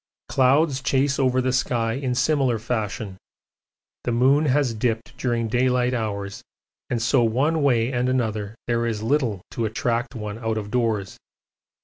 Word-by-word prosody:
Clouds 135 +1 +3
chase 135 +1 +1
over 130 -1 +2
the 130 0 0
sky 115 -3 0
in 130 -1 -2
similar 130 -2 +2
fashion: 110 -3 -3 0.9
the 120 - -1
moon 135 +6 +3
has 135 -3 +2
dipped 115 +1 -2
during 120 -2 -1
daylight 125 +1 +1
hours, 105 -4 -3 0.5
and 120 - 0
so 120 +3 +3
one 140 +8 +1
way 125 -3 +2
and 125 +1 +1
another 110 -4 -1
there 120 0 0
is 110 -2 -3
little 115 -7 0
to 115 - -2
attract 115 +4 -1
one 105 -1 -5
out 110 -1 -2
of 105 -1 -5
doors. 115 -6 -1
120 Hz, 150 wpm, -23 LUFS, 110-130 Hz, 0.9 s, Clouds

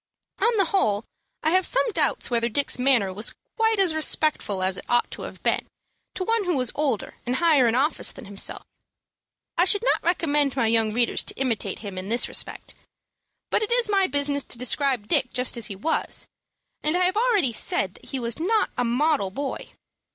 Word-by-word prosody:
On 465 -1 +2
the 395 - +3
whole, 220 - 0 0.4
I 315 - +2
have 370 +1 +3
some - - +4
doubts 370 - 0
whether 235 0 +1
Dick's 280 +3 +2
manner 245 -7 +2
was 210 +4 +1 0.2
quite 445 -1 +1
as 380 -5 +3
respectful 305 -10 +1
as 190 0 +1
it - - -12
ought 240 0 +1
to - - -8
have - - -9
been - - 0 0.5
to 370 - -2
one 450 +1 0
who 350 -5 0
was 255 -3 +1
older 275 -8 -2
and 250 +1 -2
higher 300 -5 +3
in 230 - +1
office 285 +4 +1
than - - -10
himself. 200 0 -2 1.0
I 355 - +5
should 410 +3 +3
not - - +1
recommend 295 -5 +1
my 260 - +1
young 225 -1 +2
readers 235 +2 +1
to - - -1
imitate 230 -7 -2
him 190 -2 -5
in 190 +2 -7
this 235 +2 +3
respect. - - -5 0.8
But - - +1
it 435 - -3
is 475 -2 +2
my 390 -2 +3
business 285 -2 +1
to - - -1
describe 255 -2 0
Dick 250 - +1
just 250 +1 +1
as 235 -2 +1
he 200 - -6
was, 310 +12 -1 0.5
and 310 +3 +1
I 365 - +2
have 370 +2 0
already 425 - +2
said 195 -3 0
that - - -17
he 270 - -5
was 235 +1 -2
not 430 +7 +1
a - - +2
model 250 -2 +1
boy. 275 +8 -5
275 Hz, 205 wpm, -24 LUFS, 230-355 Hz, 1.0 s, I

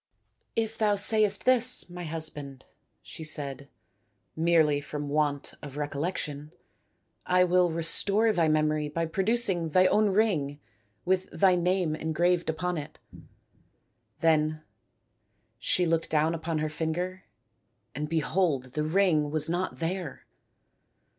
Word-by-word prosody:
" - - -48
If 225 +1 -12
thou 210 -2 +2
sayest 210 0 +3
this, 255 -1 +4
my 175 -1 -8
husband," 150 -4 -3 0.4
she 160 - -9
said, 140 -3 0 0.3
" 115 - -46 0.2
merely 160 -3 +2
from 145 0 -6
want 145 -1 -1
of 145 -2 -9
recollec 150 +4 -3
tion, 150 +1 -6 0.8
I 180 0 +4
will 180 0 +3
restore 200 +7 +1
thy 170 -4 +2
memory 155 -1 +1
by 165 +3 -2
producing 190 -1 0
thy 185 +4 +4
own 210 +2 +3
ring 175 -9 0 0.5
with 185 0 0
thy 190 -2 +3
name 180 -2 0
engraved 170 +3 0
upon 165 +1 -2
it." 145 - -9 1.2
Then 155 -1 +1 1.0
she 180 - +2
looked 165 -1 0
down 155 +1 +1
upon 165 0 -3
her 155 0 -1
finger 170 +4 -4 0.7
and 150 +3 -4
behold 155 -5 0
the 150 - -1
ring 155 -3 +2
was 155 +1 0
not 175 +2 -2
there 170 -3 -4
165 Hz, 130 wpm, -27 LUFS, 150-185 Hz, 1.2 s, this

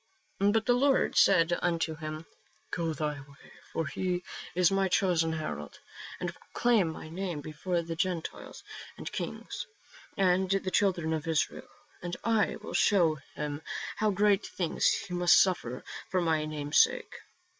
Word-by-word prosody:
But 205 +3 +3
the 245 - +4
Lord 270 +2 +2
said 175 -3 +5
unto 165 -2 0
him, 155 0 -6 0.2
" - - -37
Go 165 -2 -1
thy 150 -2 -2
way: 140 0 -16 0.2
for 165 - -1
he 180 +5 -2 0.3
is 180 -1 +4
my 195 0 +2
chosen 175 -4 +2
herald, 115 - -5 0.4
to 175 -1 -3
proclaim 230 -1 +1
my 160 - -9
name 175 -1 -4
before 170 +4 -2
the 165 0 -5
Gentiles, 175 -1 -3 0.3
and - - -6
kings, - - -5 0.5
and 185 0 +3
the 195 -1 0
Children 175 -6 +2
of 155 0 -3
Israel: 160 -2 -1 0.3
and 175 -1 -4
I 225 -2 +2
will - - -7
show 165 -7 +3 0.2
him 145 0 -4 0.4
how 215 - +2
great 205 0 +2
things 175 -3 0
he 180 - 0
must 175 0 +6
suffer 130 -10 +1 0.3
for 185 - +1
my 160 -3 +1
name's 150 -1 0
sake." - - +3
175 Hz, 155 wpm, -30 LUFS, 155-190 Hz, 0.5 s, must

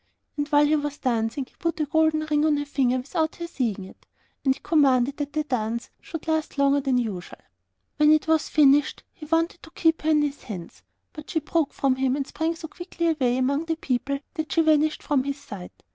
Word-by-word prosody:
And 290 -1 -2
while 290 0 +4
he 305 +1 +3
was 290 -1 -2
dancing, 235 +2 -1
he - - -27
put 335 0 -2
a 305 - +1
gold 315 +1 +2
ring 305 -1 0
on 305 -1 +3
her 290 - -2
finger 260 -3 +1
without 315 +5 -2
her 340 - -5
seeing 230 - -2
it, - - -16 0.4
and 265 -1 +3
he - - -15
commanded 275 -4 +3
that 290 -1 -4
the 305 0 0
dance 235 -4 -3
should 325 -2 -8
last 315 -2 -1
longer 280 0 +3
than 265 -2 +1
usual. 210 -7 -4 0.6
When 300 0 +5
it 310 +1 +3
was 320 -1 +2
finished 290 -1 +4
he 310 - -11
wanted 330 +2 0
to - - -13
keep 325 -1 +1
her 310 - 0
hands 295 -2 +1
in 190 -5 -4
his, - - -19 0.3
but 305 0 -10
she 320 - 0
broke 310 0 0
from 265 -2 +1
him, 260 0 +1
and 280 -1 -2
sprang 325 +4 -2
so 325 0 -8
quickly 340 0 -3
away 255 -6 +1
among 280 +5 0
the 325 -1 -1
people 275 -2 -1 0.2
that 315 -4 -4
she 330 - +3
vanished 310 0 +2
from 285 -4 +1
his 280 +1 -3
sight. 195 -9 -10
295 Hz, 220 wpm, -25 LUFS, 265-315 Hz, 0.6 s, When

